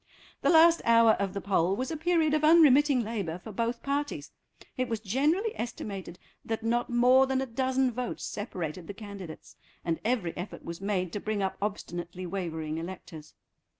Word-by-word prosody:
The - - +2
last 335 0 +6
hour 230 -1 +6
of 200 -2 -1
the 200 - -3
poll 190 -1 +1
was 255 +7 -3
a - - -2
period 325 -1 +2
of 310 0 +1
unremitting 295 -4 +6
labour 200 -7 -3
for 200 +4 -10
both 235 +3 -2
parties; 285 +1 -3 0.4
it 255 0 -2
was 225 -1 -1
generally 295 - +1
estimated 195 -6 -6 0.3
that 225 0 -3
not 240 +1 0
more 250 +2 +5
than 265 0 0
a 265 - -1
dozen 260 +1 0
votes 245 +1 -4
separated 175 -5 -5
the 200 - -7
candidates, 200 -6 -10 0.3
and 165 -2 -1
every 220 -7 -1
effort 180 +3 -7
was 170 +2 -7
made 185 -4 -1
to 205 - -2
bring 210 -1 -2
up 190 - -1
obstinately 180 -3 -4
wavering 160 -4 -4
electors. 165 -3 -9
220 Hz, 175 wpm, -29 LUFS, 185-260 Hz, 0.4 s, last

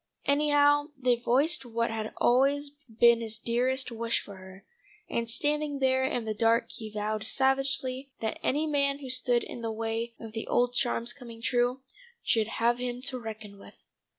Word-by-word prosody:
Anyhow 290 0 +3
they 250 -2 +2
voiced 260 +8 +1
what 230 -1 -2
had 220 -1 -4
always 280 +3 +2 0.2
been 235 +1 +4
his 220 -1 -3
dearest 250 +3 0
wish 230 0 -1
for 200 -1 -11
her, 190 +1 -13 0.4
and 230 0 -2
standing 295 +3 0
there 260 -1 +2
in 260 -4 -1
the 215 - -2
dark 230 +2 +2
he 220 -1 -7
vowed 215 0 -3
savagely 270 0 +2
that 220 -1 -3
any 295 +4 +1
man 280 -2 +1
who 270 -3 -6
stood 250 -1 +2
in 240 - -8
the 225 -1 -3
way 225 +1 -3
of 225 -2 -9
the 225 - -5
old 245 0 +2
charm's 240 -1 0
coming 235 -3 -11
true, 245 +2 0 0.4
should 220 -2 +2
have 235 +2 +1
him 245 0 -3
to 255 -1 0
reckon 215 -3 -8
with. - - -14
240 Hz, 175 wpm, -28 LUFS, 225-270 Hz, 0.4 s, been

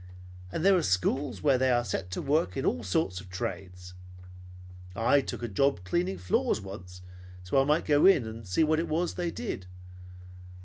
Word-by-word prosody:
And 160 - -2
there 195 0 +6
are 180 - +3
schools 115 - -1
where 135 -4 +3
they 130 0 +2
are 120 -1 +2
set 95 -5 -3
to 90 - -4
work 150 +2 0
at 135 - -2
all 125 - 0
sorts 90 - -1
of 95 - -14
trades. 90 0 -6 1.0
I 120 +6 +3
took 125 - -6
a - - -1
job 135 0 +1
cleaning 90 +1 -1
floors 90 +3 0
once 90 -2 -10 0.4
so 90 - -4
that - - +6
I - - +1
might 150 +3 +1
go 145 +3 +5
in 170 -11 +5
and 110 -1 -8
see 90 - +2
what 155 0 +2
it 165 - -2
was 170 +3 -1
they 175 -1 -2
did. 95 - -5
115 Hz, 195 wpm, -28 LUFS, 90-145 Hz, 1.0 s, there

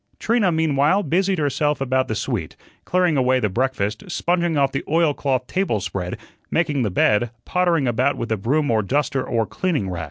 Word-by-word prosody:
Trina, 225 -5 +1
meanwhile, 160 +4 +2
busied 185 +5 +1
herself 150 0 0
about 130 -1 0
the 110 - -2
suite, 105 - -3 0.3
clearing 180 -4 +2
away 130 0 +3
the 105 - 0
breakfast, 110 -2 -1
sponging 175 -2 0
off 140 -1 +2
the 135 - -3
oilcloth 145 -5 +1
table 185 - -1
spread, 90 -1 -4 0.3
making 150 -5 0
the 110 - 0
bed, 105 +5 +2 0.2
pottering 175 -6 +1
about 125 +4 +1
with 115 -1 -4
a 110 - +1
broom 140 +7 0
or 110 -1 +2
duster 135 +4 0
or 115 -2 0
cleaning 145 - -2
rag. 90 - -4
135 Hz, 180 wpm, -21 LUFS, 115-165 Hz, 0.3 s, away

